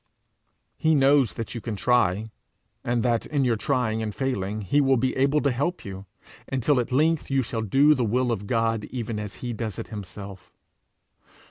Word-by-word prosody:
He 160 0 +3
knows 135 -5 +4
that 115 - -5
you 120 - -5
can 115 -2 -4
try, 110 -2 +1 0.5
and 120 -1 0
that 120 -2 +1
in 145 -3 0
your 120 -2 +2
trying 110 -2 0
and 105 -2 -4
failing 110 -6 -2
he 105 +9 +2
will 135 -1 +3
be 130 +2 0
able 140 +3 +2
to 140 - +2
help 145 +9 -2
you, 95 0 -8 0.4
until 135 +1 +2
at 120 - -2
length 155 +4 +2
you 135 -1 +2
shall 115 -1 -3
do 135 +8 +4
the 130 -4 0
will 120 +3 +1
of 105 -3 -3
God 115 -2 0
even 115 -3 -4
as 105 -3 -6
he 120 - -2
does 110 -3 -4
it - - -6
himself. 100 -3 -9
120 Hz, 190 wpm, -25 LUFS, 105-135 Hz, 0.5 s, knows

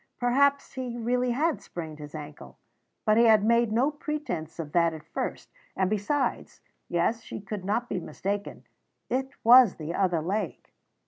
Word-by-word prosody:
Perhaps 280 +3 +2
he 250 -2 -4
really 245 +2 0
had 300 +7 0
sprained 160 -3 -7
his 150 +1 -9
ankle. 150 -1 -9 0.5
But 215 -1 +4
he 235 - +6
had 220 -2 +6
made 235 0 +3
no 250 +7 +2
pretence 295 - -4
of 155 -3 -5
that 170 -1 +2
at 155 - -10
first, - - -5 0.2
and 190 +1 0
besides, 240 +5 -1 0.3
yes, 175 +7 +1
she - - -7
could 200 -1 -6
not 220 +5 -1
be 185 - -2
mistaken, 200 +5 -4 0.5
it 265 +2 0
was 240 -2 +8
the 155 +1 -5
other 180 -5 +1
leg. 185 - -3
215 Hz, 165 wpm, -27 LUFS, 170-245 Hz, 0.5 s, was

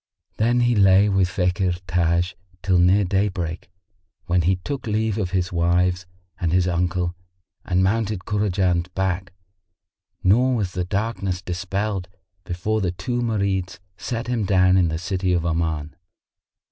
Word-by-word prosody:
Then 120 +3 +2
he 120 0 +3
lay 100 -1 +5
with 95 -2 +2
Fakhr 90 -1 0
Taj 85 +1 +1 0.3
till 90 -2 +3
near 95 +4 +4
daybreak, 90 -3 -2 0.6
when 90 0 +2
he 90 +3 +2
took 130 +8 -5
leave 110 0 0
of 95 -4 -1
his 90 -1 -1
wives 90 +1 +1 0.3
and 85 -4 0
his 90 +1 +2
uncle 90 0 -1 0.5
and 90 +1 +1
mounted 105 -1 0
Kurajan's 95 -4 0
back, 95 0 -1 0.9
nor 125 +7 +4
was 100 -6 -1
the 90 0 -2
darkness 100 -2 -2
dispelled 95 +1 -3 0.4
before 105 +5 -1
the 90 -3 0
two 110 +8 -3
Marids 100 -5 -1 0.2
set 115 +5 -4
him 120 -3 -1
down 95 -1 +4
in 90 -2 +4
the 80 0 -2
city 90 +1 -1
of 85 -1 0
Oman. 80 -2 -2
95 Hz, 145 wpm, -23 LUFS, 90-105 Hz, 0.9 s, lay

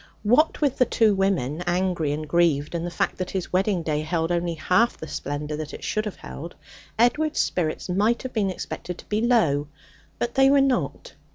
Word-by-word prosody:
What 260 +12 +3
with 285 -3 +1
the 255 - +6
two 220 -3 +3
women, 180 -7 0
angry 175 -4 0
and 155 +1 -3
grieved, 160 -3 +2
and 170 0 -2
the - - -2
fact 170 - -2
that 185 0 -2
his 190 -2 -4
wedding 190 -1 +1
day 150 -1 -1
held 165 +1 -1
only 170 -1 0
half 180 +9 +2
the 160 - -8
splendour 150 +1 -4
that 155 -1 -6
it - - -11
should 215 0 -1
have 210 - -4
held, 170 +4 -9 0.4
Edward's 295 +7 +2
spirits 160 -3 -1
might 205 +6 +1
have 260 - -6
been 205 -4 +1
expected 180 -1 -6
to - - -13
be 210 +1 0
low; 170 - +2 0.5
but 240 0 -2
they 270 0 +5
were 280 0 +5
not. 270 -2 0
180 Hz, 200 wpm, -24 LUFS, 160-225 Hz, 0.5 s, the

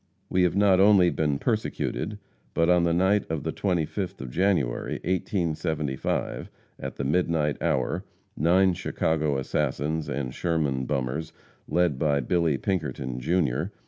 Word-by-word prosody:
We 95 - +3
have 90 0 +2
not 100 -2 +4
only 95 -3 +6
been 75 -3 0
persecuted, 110 - -2 0.4
but 85 +1 +3
on 90 -1 +4
the 85 - +2
night 95 +4 +3
of 80 -3 -2
the - - -2
25th 90 0 -2
of 65 -1 -6
January, 90 -8 +1
1875, 80 -6 -2 0.3
at - - -5
the - - -3
midnight 75 0 +1
hour, 65 -2 0 0.3
nine 90 +4 +4
Chicago 80 -4 0
assassins 75 +3 -1
and 65 -2 -3
Sherman 75 -7 0
bummers, 70 +6 -2 0.3
led 85 -7 +1
by 75 -3 +2
Billy 80 +2 +1
Pinkerton, 70 - -2
Jr. 75 -1 +1
80 Hz, 135 wpm, -26 LUFS, 70-90 Hz, 0.4 s, only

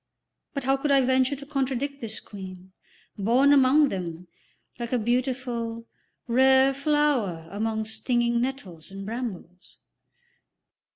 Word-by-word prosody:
But 275 - -2
how 270 +1 +2
could 290 +2 -2
I 275 -1 +5
venture 260 +1 +2
to 280 +1 -10
contradict 275 0 -2
this 220 -1 -4
Queen, 190 -2 -10 0.5
born 250 +8 +4
among 280 +2 +5
them, 175 -3 -5 0.5
like 235 -1 -4
a 250 - +2
beautiful, 240 -1 -2 0.4
rare 265 +2 +5
flower 275 - 0
among 220 +1 -2
stinging 235 +2 0
nettles 200 - -5
and 195 0 -8
brambles? 200 -6 -7
245 Hz, 120 wpm, -26 LUFS, 210-270 Hz, 0.5 s, I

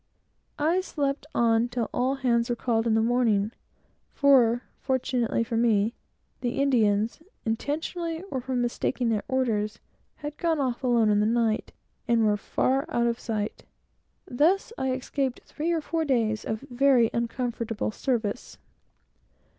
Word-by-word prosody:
I 330 +5 +2
slept 290 -5 -2
on 230 0 +3
till 245 -2 -2
all 260 +2 +1
hands 240 -3 +1
were 240 - +1
called 230 -1 0
in 220 - +3
the 220 - +3
morning; 225 -3 +2 0.6
for, 250 -4 +4 0.2
fortunately 250 -3 0
for 230 0 -3
me, 225 -1 +2 0.5
the 245 +1 -2
Indians, 225 -3 +2 0.2
intentionally, 320 +8 -2
or 260 - -2
from 255 0 -1
mistaking 240 0 -1
their 215 -2 +1
orders, 220 -6 0 0.4
had 295 0 -7
gone 330 -3 +1
off 260 -1 -1
alone 235 -4 +3
in 205 - +3
the 210 - +2
night, 225 -1 +1 0.4
and 230 -2 +3
were 210 -1 +3
far 265 +6 0
out 235 - +1
of 235 0 0
sight. 215 -2 -3 0.6
Thus 345 - +1
I 265 - -1
escaped 260 0 -2
three 320 +3 -3
or 330 -2 +1
four 325 +1 -1
days 230 -7 0
of 220 0 -3
very 260 -3 +3
uncomfortable 235 -2 -2
service. 235 -1 -2
240 Hz, 145 wpm, -26 LUFS, 225-275 Hz, 0.6 s, for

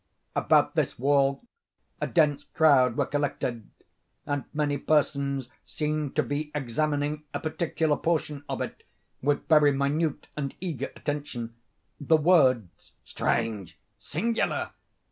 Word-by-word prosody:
About - - +3
this - - 0
wall 140 - +2 0.6
a - - 0
dense 145 -4 +2
crowd 135 -6 +4
were - - +2
collected, 130 -6 -2 0.6
and 145 -1 -2
many 150 -1 0
persons 140 -3 +1 0.2
seemed 150 -2 -3
to 155 - +3
be 145 +4 -3
examining 150 +3 -1
a - - 0
particular 160 -1 0
portion 150 -3 -1
of - - -2
it - - -5 0.4
with 145 +1 0
very 150 -2 +6
minute 140 +3 0
and 140 -3 -4
eager 155 -8 -4
attention. 140 -6 -4 0.5
The 160 +2 +4
words 135 - +2
"strange!" 110 -6 -2 0.2
"singular!" 225 +9 -1
145 Hz, 120 wpm, -27 LUFS, 135-155 Hz, 0.6 s, very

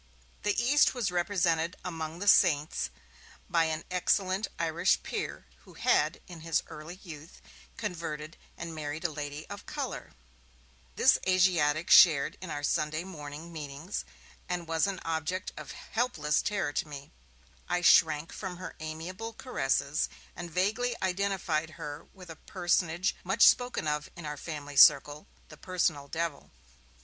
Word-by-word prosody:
The 210 -1 +1
East 265 +4 +4
was 225 -7 -1
represented 175 -2 +1
among 160 -2 -4
'the 205 +3 -5
saints' 150 - +4 0.6
by 165 -1 +3
an 160 0 -2
excellent 185 +2 +1
Irish 170 +2 +1
peer, - - -4
who - - -18
had, - - +2
in 175 -2 -10
his 165 0 0
early 155 +4 -9
youth, 155 -2 -11 0.4
converted 160 -2 -5 0.2
and 170 -1 -6
married 155 +1 -5
a 170 - +1
lady 145 0 -6
of - - -9
colour; - - -5 0.8
this - - +5
Asiatic 175 -4 +3
shared 155 -6 +7
in 185 - -7
our 145 -1 -4
Sunday 155 +2 0
morning 160 -2 -8
meetings, 150 +4 -5 0.5
and 175 -2 -3
was 165 +2 +1
an 195 -1 -3
object 165 +4 -2
of - - -8
helpless 165 -11 -1
terror 195 -8 -1
to - - -1
me; 140 -1 -9 0.6
I 175 0 +1
shrank 160 -2 +4
from 185 -3 -6
her 185 - -8
amiable 170 +8 -6
caresses, 145 - -1 0.3
and 175 -1 -6
vaguely 215 +8 0
identified 180 -4 -1
her 145 +1 -7
with 185 -3 -12
a - - -8
personage 175 0 +1
much 195 +5 +2
spoken 245 -10 +4
of 150 0 -1
in 175 -3 -9
our 150 0 -4
family 145 -2 -7
circle, 145 +1 +6 0.2
the - - -12
'Personal 170 -6 -1
Devil'. 165 -1 -3
165 Hz, 145 wpm, -30 LUFS, 150-185 Hz, 0.8 s, shared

